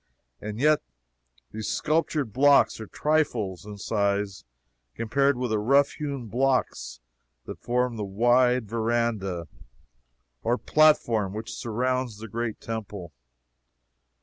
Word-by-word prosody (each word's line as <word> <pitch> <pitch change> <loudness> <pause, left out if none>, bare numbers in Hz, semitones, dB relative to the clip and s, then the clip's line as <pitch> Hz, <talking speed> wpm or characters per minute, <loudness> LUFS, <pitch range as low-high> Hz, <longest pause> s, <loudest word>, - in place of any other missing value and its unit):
And 105 +1 -6
yet 150 +2 +4 0.7
these 110 -1 -5
sculptured 150 -6 0
blocks 140 0 +4
are 110 - -7
trifles 115 - -1
in 105 -1 -8
size 100 -1 -1 0.5
compared 135 +4 +1
with 125 -2 -2
the 110 - +1
rough 140 +6 +3
hewn 140 -5 -5
blocks 125 - -1 0.5
that - - -8
form 125 0 0
the 105 - -3
wide 120 +4 +2
verandah 110 -6 -1 0.9
or 120 +2 +1
platform 115 -12 +3
which 110 - -6
surrounds 125 0 -2
the 110 +1 -8
Great 115 +1 -4
Temple. 105 -6 -6
115 Hz, 115 wpm, -26 LUFS, 105-130 Hz, 0.9 s, yet